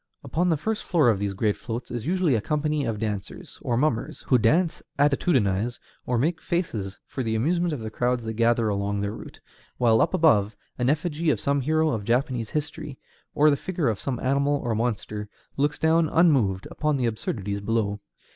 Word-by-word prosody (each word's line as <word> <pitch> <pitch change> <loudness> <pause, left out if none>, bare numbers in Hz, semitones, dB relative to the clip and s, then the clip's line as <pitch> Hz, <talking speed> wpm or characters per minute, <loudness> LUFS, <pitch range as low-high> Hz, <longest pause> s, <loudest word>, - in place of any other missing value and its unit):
Upon 175 +3 0
the 160 - +2
first 220 +8 -2
floor 155 -9 +3
of 105 -4 +2
these 100 -1 -2
great 105 +1 +1
floats 120 0 -6
is 120 0 -4
usually 180 -4 +2
a 110 - +1
company 150 +2 0
of 115 -2 -2
dancers, 105 -2 -5
or 120 - 0
mummers, 130 -4 -1
who 125 - +3
dance, 160 +10 +2 0.2
attitudinize, 125 - +2 0.3
or 125 - +1
make 155 +6 0
faces 110 - -3
for 130 - -5
the 110 -2 -1
amusement 170 +9 +1
of 145 -6 -4
the 110 0 -5
crowds 125 +1 0
that 110 0 -4
gather 115 0 +2
along 100 0 -1
their 100 0 -1
route; 110 - -10 0.4
while 115 -2 +4
up - - +2
above, 105 -10 +3 0.2
an 125 +1 +2
effigy 160 +2 0
of 125 -9 +2
some 140 +3 +1
hero 155 +2 +2
in 110 -3 -3
Japanese 120 0 0
history, 150 -2 -4 0.4
or 150 +1 +5
the - - +3
figure 170 -3 -1
of 105 - -2
some 130 -3 -3
animal 140 +2 +2
or 120 - 0
monster, 105 -2 -2 0.3
looks 145 +1 0
down 160 0 +3
unmoved 130 - +3
upon 150 -2 0
the 125 - 0
absurdities 105 -3 -3
below. 105 -1 -1
125 Hz, 195 wpm, -25 LUFS, 110-150 Hz, 0.4 s, or